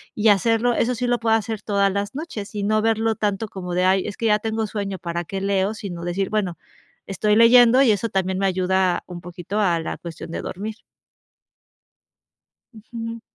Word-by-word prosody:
y 215 Hz, +1 st, +1 dB
hacerlo, 225 Hz, +4 st, +3 dB
eso 245 Hz, +1 st, +1 dB
sí 245 Hz, +1 st, -2 dB
lo 245 Hz, 0 st, +1 dB
puedo 225 Hz, -1 st, +2 dB
hacer 220 Hz, -1 st, -2 dB
todas 200 Hz, -1 st, +2 dB
las 200 Hz, +1 st, -3 dB
noches 270 Hz, -10 st, -6 dB
y 205 Hz, -, -2 dB
no 215 Hz, +1 st, +2 dB
verlo 225 Hz, 0 st, +1 dB
tanto 210 Hz, +1 st, -1 dB
como 180 Hz, -3 st, -6 dB
de: 180 Hz, +1 st, +2 dB
"Ay, 190 Hz, 0 st, +3 dB
es 205 Hz, -, -5 dB
que 230 Hz, -, 0 dB
ya 210 Hz, -1 st, +4 dB
tengo 220 Hz, 0 st, -2 dB
sueño, 200 Hz, -2 st, -4 dB
¿para 170 Hz, 0 st, -3 dB
qué 195 Hz, +3 st, -5 dB
leo?", 195 Hz, +1 st, +1 dB
sino 190 Hz, -6 st, -7 dB
decir: 185 Hz, +2 st, -1 dB
"Bueno, 195 Hz, -5 st, -1 dB, 0.5 s
estoy 210 Hz, +2 st, +1 dB
leyendo 240 Hz, +3 st, +7 dB
y 250 Hz, -, +5 dB
eso 220 Hz, +2 st, 0 dB
también 190 Hz, -1 st, -1 dB
me 195 Hz, -, +1 dB
ayuda 185 Hz, -1 st, +1 dB
un 175 Hz, -1 st, -8 dB
poquito 180 Hz, +4 st, -5 dB
a 175 Hz, -5 st, +2 dB
la 165 Hz, -, -4 dB
cuestión 165 Hz, -1 st, -9 dB
de -, -, -4 dB
dormir". 210 Hz, +4 st, -5 dB, 2.0 s
Ujú. 230 Hz, +1 st, -7 dB
205 Hz, 195 wpm, -22 LUFS, 190-225 Hz, 2.0 s, leyendo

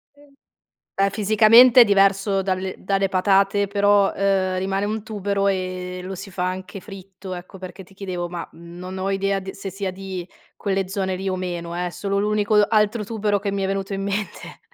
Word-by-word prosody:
Em 285 Hz, 0 st, -21 dB, 0.6 s
beh, 195 Hz, 0 st, +2 dB
fisicamente 220 Hz, +4 st, +7 dB
è -, -, +11 dB
diverso 195 Hz, -1 st, +3 dB
dalle 190 Hz, 0 st, -2 dB
dalle 195 Hz, 0 st, 0 dB
patate, 195 Hz, +1 st, +2 dB
però, 205 Hz, 0 st, +3 dB
uhm, 190 Hz, -1 st, +1 dB
rimane 195 Hz, +2 st, -1 dB
un 215 Hz, 0 st, -3 dB
tubero 200 Hz, -2 st, -1 dB
e 185 Hz, -1 st, -2 dB
lo 190 Hz, +1 st, -5 dB
si 195 Hz, +1 st, -9 dB
fa 180 Hz, 0 st, -2 dB
anche 185 Hz, +2 st, -5 dB
fritto, 190 Hz, -1 st, -10 dB
ecco. 180 Hz, +1 st, -9 dB
Perché 185 Hz, 0 st, -9 dB
ti 190 Hz, +2 st, -20 dB
chiedevo, 180 Hz, -3 st, -5 dB
ma 175 Hz, -1 st, -6 dB
non 175 Hz, +3 st, -9 dB
ho 190 Hz, +1 st, -2 dB
idea 195 Hz, 0 st, 0 dB
d 190 Hz, 0 st, -6 dB
se 195 Hz, 0 st, -7 dB
sia 195 Hz, 0 st, -4 dB
di 185 Hz, -2 st, -6 dB, 0.3 s
quelle 195 Hz, -2 st, -1 dB
zone 190 Hz, -1 st, -2 dB
lì 195 Hz, -, -5 dB
o 185 Hz, -, -1 dB
meno, 175 Hz, -2 st, -4 dB
eh, 180 Hz, 0 st, -1 dB
è -, -, -4 dB
solo 200 Hz, +2 st, -2 dB
l'unico 210 Hz, +1 st, +1 dB
altro 215 Hz, 0 st, +2 dB
tubero 210 Hz, -1 st, -1 dB
che 200 Hz, 0 st, -3 dB
mi 195 Hz, 0 st, -2 dB
è 190 Hz, -, 0 dB
venuto 195 Hz, 0 st, -3 dB
in 195 Hz, -, -3 dB
mente. 200 Hz, +1 st, -4 dB
195 Hz, 195 wpm, -22 LUFS, 185-200 Hz, 0.6 s, è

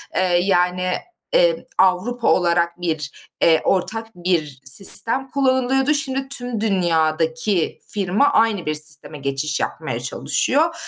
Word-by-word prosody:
eee, -, -, +2 dB, 0.2 s
yani, 180 Hz, -1 st, +1 dB, 0.4 s
eee, -, -, +2 dB
Avrupa 210 Hz, +6 st, +1 dB
olarak 170 Hz, 0 st, +1 dB
bir, 155 Hz, -4 st, -2 dB, 0.3 s
eee, 165 Hz, -1 st, +4 dB
ortak 220 Hz, +4 st, 0 dB
bir 170 Hz, -6 st, -2 dB
sistem 225 Hz, -, +1 dB
kullanılıyordu. 265 Hz, +1 st, +1 dB
Şimdi 270 Hz, -2 st, -1 dB
tüm 245 Hz, -5 st, -1 dB
dünyadaki 165 Hz, -2 st, 0 dB
firma 200 Hz, +6 st, +1 dB
aynı 215 Hz, -5 st, +2 dB
bir 155 Hz, -, -1 dB
sisteme 150 Hz, 0 st, 0 dB
geçiş 140 Hz, +1 st, -1 dB
yapmaya 130 Hz, -8 st, -4 dB
çalışıyor. 260 Hz, -, 0 dB
180 Hz, 115 wpm, -20 LUFS, 160-245 Hz, 0.4 s, eee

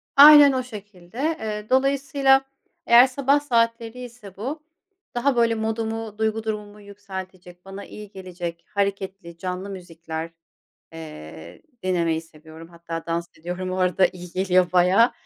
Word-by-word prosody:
Aynen 290 Hz, 0 st, +10 dB
o 260 Hz, -1 st, -1 dB
şekilde. 205 Hz, -5 st, -12 dB, 0.2 s
Eee, 210 Hz, -1 st, -5 dB
dolayısıyla 275 Hz, 0 st, +3 dB, 0.4 s
eğer 240 Hz, +2 st, +7 dB
sabah 275 Hz, +2 st, +2 dB
saatleri 230 Hz, -3 st, 0 dB
ise 230 Hz, -6 st, -12 dB
bu, 280 Hz, +9 st, -5 dB, 0.5 s
daha 260 Hz, +2 st, +1 dB
böyle 230 Hz, -1 st, +3 dB
modumu, 220 Hz, -1 st, -3 dB
duygu 220 Hz, 0 st, -1 dB
durumumu 210 Hz, -1 st, -5 dB
yükseltecek, 190 Hz, -3 st, -10 dB
bana 195 Hz, +1 st, -8 dB
iyi 210 Hz, -1 st, -11 dB
gelecek, 175 Hz, -3 st, -7 dB
hareketli, 195 Hz, -3 st, -3 dB
canlı 185 Hz, +2 st, -5 dB
müzikler, 165 Hz, -3 st, -7 dB, 0.6 s
eee, 80 Hz, -, -10 dB, 0.2 s
dinlemeyi 170 Hz, -3 st, 0 dB
seviyorum. 160 Hz, 0 st, -14 dB
Hatta 170 Hz, -1 st, -7 dB
dans 170 Hz, +1 st, -2 dB
ediyorum 180 Hz, +3 st, -5 dB
o 185 Hz, -, -3 dB
arada, 185 Hz, 0 st, +3 dB
iyi 180 Hz, -1 st, -10 dB
geliyor 185 Hz, -1 st, +2 dB
bayağı. 185 Hz, +6 st, +4 dB
195 Hz, 130 wpm, -23 LUFS, 175-230 Hz, 0.6 s, Aynen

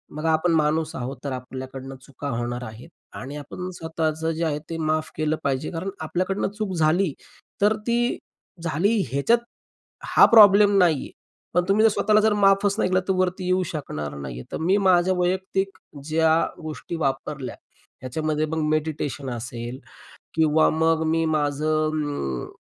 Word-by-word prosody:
बघा 160 Hz, +1 st, 0 dB
आपण 160 Hz, +2 st, +2 dB
माणूस 155 Hz, +1 st, +1 dB
आहोत, 130 Hz, -1 st, -5 dB
तर 140 Hz, -, -3 dB
आपल्याकडून 130 Hz, +1 st, -7 dB
चुका 140 Hz, +2 st, -7 dB
होणार 120 Hz, 0 st, -3 dB
आहेत 115 Hz, +6 st, -10 dB, 0.3 s
आणि 135 Hz, +3 st, -7 dB
आपण 180 Hz, +5 st, -7 dB
स्वतःचं 160 Hz, -1 st, -2 dB
जे 165 Hz, +1 st, -3 dB
आहे 150 Hz, -2 st, -1 dB
ते 165 Hz, -, -4 dB
माफ 155 Hz, 0 st, -1 dB
केलं 155 Hz, 0 st, +1 dB
पाहिजे. 135 Hz, +1 st, -1 dB
कारण 170 Hz, +3 st, -4 dB
आपल्याकडनं 185 Hz, +5 st, -1 dB
चूक 210 Hz, -3 st, -2 dB
झाली, 160 Hz, +1 st, +2 dB, 0.5 s
तर 210 Hz, +2 st, +4 dB
ती 240 Hz, +1 st, +1 dB, 0.5 s
झाली 175 Hz, +7 st, +1 dB
ह्याच्यात 140 Hz, -, +3 dB, 0.8 s
हा -, -, +10 dB
प्रॉब्लेम 205 Hz, -2 st, +8 dB
नाहीये. 170 Hz, -7 st, +2 dB, 0.4 s
पण 180 Hz, +1 st, +3 dB
तुम्ही 210 Hz, +2 st, +4 dB
जर -, -, +7 dB
स्वतःला 210 Hz, +1 st, +3 dB
जर 215 Hz, 0 st, +3 dB
माफच 200 Hz, 0 st, +3 dB
नाही -, -, +1 dB
केला 185 Hz, 0 st, +3 dB
तर 190 Hz, -, +2 dB
वरती 185 Hz, 0 st, 0 dB
येऊ 185 Hz, +1 st, +2 dB
शकणार 75 Hz, -, -5 dB
नाहीये. 65 Hz, -3 st, -7 dB
तर -, -, -3 dB
मी 180 Hz, +5 st, +2 dB
माझ्या 185 Hz, -2 st, +3 dB
वैयक्तिक 190 Hz, +2 st, -1 dB, 0.3 s
ज्या 160 Hz, +1 st, +3 dB, 0.2 s
गोष्टी 155 Hz, +2 st, -6 dB
वापरल्या 135 Hz, -2 st, -3 dB, 0.5 s
ह्याच्यामध्ये 155 Hz, +4 st, -1 dB
मग 160 Hz, +1 st, -2 dB
मेडिटेशन 150 Hz, -3 st, -2 dB
असेल 120 Hz, +1 st, -6 dB, 0.6 s
किंवा 160 Hz, -1 st, +4 dB
मग 160 Hz, 0 st, +2 dB
मी 165 Hz, +1 st, +1 dB
माझं 155 Hz, 0 st, 0 dB
अं, 145 Hz, -, -3 dB
160 Hz, 155 wpm, -24 LUFS, 145-185 Hz, 0.8 s, हा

